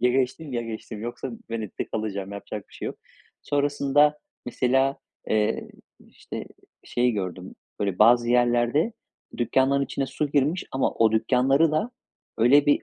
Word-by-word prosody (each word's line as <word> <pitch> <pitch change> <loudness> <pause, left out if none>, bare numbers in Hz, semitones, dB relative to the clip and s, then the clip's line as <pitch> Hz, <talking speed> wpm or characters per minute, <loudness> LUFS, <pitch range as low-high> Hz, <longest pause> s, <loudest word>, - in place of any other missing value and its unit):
Ya 125 +1 +4
geçtim, 135 +3 -1
ya 120 -1 -1
geçtim 110 -1 -7
yoksa 120 +2 -5 0.2
Venedik'te 110 -3 -4
kalacağım. 100 -2 -4
Yapacak 100 0 -7
bir - - -26
şey - - -6
yok. - - -5 0.5
Sonrasında 145 +1 +2 0.3
mesela, 135 +2 +1 0.3
eee, 105 -1 0 0.4
işte, - - -8 0.4
şey 125 0 +1
gördüm. 95 -3 -5 0.3
Böyle 100 -3 -1
bazı 120 +2 +5
yerlerde 120 - +3 0.4
dükkânların 135 +3 +2
içine 135 +1 -3
su 140 +2 -3
girmiş 150 +5 +1
ama 135 - +1
o 110 -1 +3
dükkânları 135 +7 +3
da 185 +11 0 0.5
öyle 135 +6 +5
bir, 145 - +3
125 Hz, 140 wpm, -25 LUFS, 110-140 Hz, 0.5 s, bazı